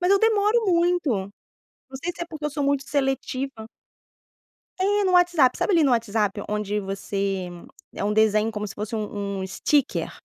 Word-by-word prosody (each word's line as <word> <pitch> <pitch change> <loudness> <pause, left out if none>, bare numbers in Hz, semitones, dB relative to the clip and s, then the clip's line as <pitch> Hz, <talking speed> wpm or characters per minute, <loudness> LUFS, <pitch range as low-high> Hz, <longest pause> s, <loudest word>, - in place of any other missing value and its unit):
mas 360 +1 +1
eu 395 - +6
demoro 440 +1 +3
muito. 350 -2 +2 0.8
Não 265 - -7
sei 350 +1 -2
se - - -6
é 340 - -4
porque 310 -3 -8
eu 300 - 0
sou 290 0 -3
muito 280 -1 +1
seletiva. 270 -3 -2 1.1
É 410 +2 +2
no 370 - +1
WhatsApp. 350 -8 +4
Sabe 400 - +1
ali, 330 - +5
no 275 - +3
WhatsApp, 215 -3 0
onde 210 0 -1
você 195 -1 -3 0.4
é - - -4
um 210 - 0
desenho 220 0 +3
como 210 -1 -4
se - - -9
fosse 210 +2 -4
um 205 -2 -4
um 190 - -3
sticker. 275 +8 0
265 Hz, 180 wpm, -24 LUFS, 210-345 Hz, 1.1 s, eu